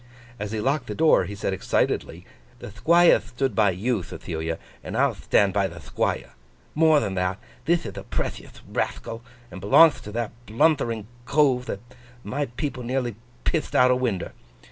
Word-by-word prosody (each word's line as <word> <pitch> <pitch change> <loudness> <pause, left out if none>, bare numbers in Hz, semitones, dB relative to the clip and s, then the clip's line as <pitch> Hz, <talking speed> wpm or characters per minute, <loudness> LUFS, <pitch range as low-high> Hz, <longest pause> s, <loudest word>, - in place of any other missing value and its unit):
As 105 0 -4
he 110 - -2
locked 140 +7 0
the - - -4
door, 155 - +4
he 100 +3 -6
said 100 -1 -2
excitedly: 95 - -1 0.3
'The - - -9
Thquire 170 - +5
thtood 130 0 -3
by 105 0 +4
you, 105 +4 -1
Thethilia, 80 -1 -5 0.3
and - - -5
I'll - - +3
thtand 100 -2 +2
by 100 -1 +2
the - - -10
Thquire. - - -2 0.4
More 155 -1 +5
than 100 -7 -2
that: 90 0 -1 0.3
thith 170 -3 +2
ith 100 - -6
a - - -8
prethiouth - - -5
rathcal, 115 0 -3 0.3
and 90 - -8
belongth 150 - +6
to 105 - -7
that 115 -1 -2 0.2
bluthtering 115 -2 +1 0.2
Cove 135 -4 +2
that 100 - -4 0.4
my 145 +1 -2
people 130 +2 -4
nearly 125 -2 -2 0.3
pitht 160 - -1
out 125 0 +6
o' - - +4
winder. 115 -8 -2
115 Hz, 170 wpm, -25 LUFS, 100-140 Hz, 0.4 s, belongth